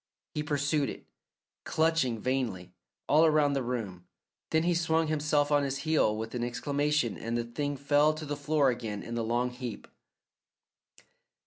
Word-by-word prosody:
He 150 - -1
pursued 145 -1 0
it, - - -8 0.6
clutching 160 -7 +1
vainly, 110 -8 -2 0.3
all 155 +2 +5
around 150 -3 +4
the 135 - 0
room, 105 -8 -4 0.4
then 160 0 +2
he 175 +1 +2
swung 165 -1 +2
himself 150 -1 +1
on 145 -1 +4
his 140 -1 -1
heel 150 -9 +2
with 110 +1 -5
an 120 -1 -2
exclamation 145 0 0
and 115 +1 -2
the 120 - 0
thing 145 +5 -3
fell 145 +2 +3
to 155 0 -6
the 145 0 -3
floor 145 -1 +2
again 110 -4 -5
in 115 - -6
the 115 -1 -1
long 120 +2 0
heap. 125 -2 -7
140 Hz, 160 wpm, -29 LUFS, 120-150 Hz, 0.6 s, all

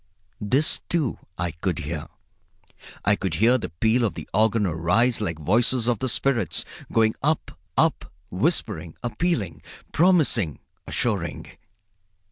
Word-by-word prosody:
This, 130 +9 +1
too, 155 -8 0 0.2
I 90 -1 -1
could 85 +1 -2
hear. 80 -1 -4 1.0
I 105 +1 +4
could 95 -5 -2
hear 115 +8 +4
the - - -5
peal 110 +8 +1
of 110 - 0
the - - -7
organ 110 0 +3
arise 90 +9 +2
like 85 -6 -2
voices 115 - +3
of 120 -4 +1
the 130 - -1
spirits, 115 - 0 0.3
going 110 -1 +3
up, 155 +2 0 0.3
up, - - +1 0.2
whispering, 95 - 0
appealing, 120 - -1 0.3
promising, 155 - +3 0.3
assuring. - - -2
110 Hz, 125 wpm, -24 LUFS, 85-125 Hz, 1.0 s, I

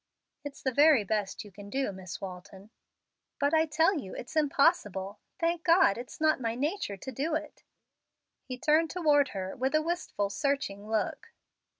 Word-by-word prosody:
"It's 290 -1 -8
the 260 - +1
very 290 -4 +6
best 205 -1 -2
you 205 - -13
can 200 +1 -11
do, 265 -1 -1
Miss 185 -2 -8
Walton." 190 +2 -9 0.7
"But 285 +1 +1
I 320 0 +4
tell 325 +3 +2
you 190 -8 -8
it's 245 - -8
impossible. 270 - +1 0.2
Thank 335 0 0
God, 335 - +5
it's 245 +1 -9
not 310 -3 +2
my 230 -1 -1
nature 285 - -2
to 265 - -7
do 295 +6 -1
it!" 310 0 -5 0.8
He 255 -2 -6
turned 315 +3 +3
toward 295 -5 +3
her 190 -4 -5
with 265 +4 0
a 310 - +4
wistful, 320 - -2
searching 275 -9 -2
look. 220 -1 -2
270 Hz, 170 wpm, -29 LUFS, 205-310 Hz, 0.8 s, very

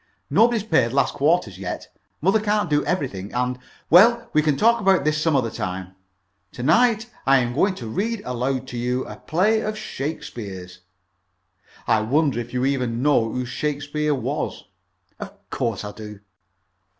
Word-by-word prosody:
"Nobody's 230 -2 +4
paid 160 - +2
last 140 - +2
quarter's 140 - +1
yet. 90 -2 -6 0.3
Mother 195 +7 +3
can't 210 -5 0
do 145 0 +3
everything, 125 - -3
and 125 0 -1
" - - -30
"Well, 230 +6 +6
we 155 - +4
can 150 -2 +1
talk 230 +1 +3
about 190 -7 +3
that 155 - +3
some 155 0 +1
other 120 -4 +1
time. 95 -4 -5 0.6
To 120 - -6
night 225 - +3 0.2
I 135 0 +6
am 120 -2 0
going 190 +8 +2
to 120 - -8
read 210 - -2
aloud 130 +1 -2
to 120 - -5
you 125 +2 -1
a - - -9
play 205 +8 +1
of 215 0 -3
Shakespeare's. 105 - -6 1.1
I 110 - +3
wonder 140 +3 +1
if 120 0 -6
you 125 +1 0
even 125 -3 -1
know 120 -6 +3
who 125 0 -3
Shakespeare 150 +2 -2
was?" 130 - -3 0.6
"Of - - -7 0.2
course 110 -3 -2
I 105 - -5
do." 105 -1 -10
140 Hz, 165 wpm, -23 LUFS, 120-180 Hz, 1.1 s, Well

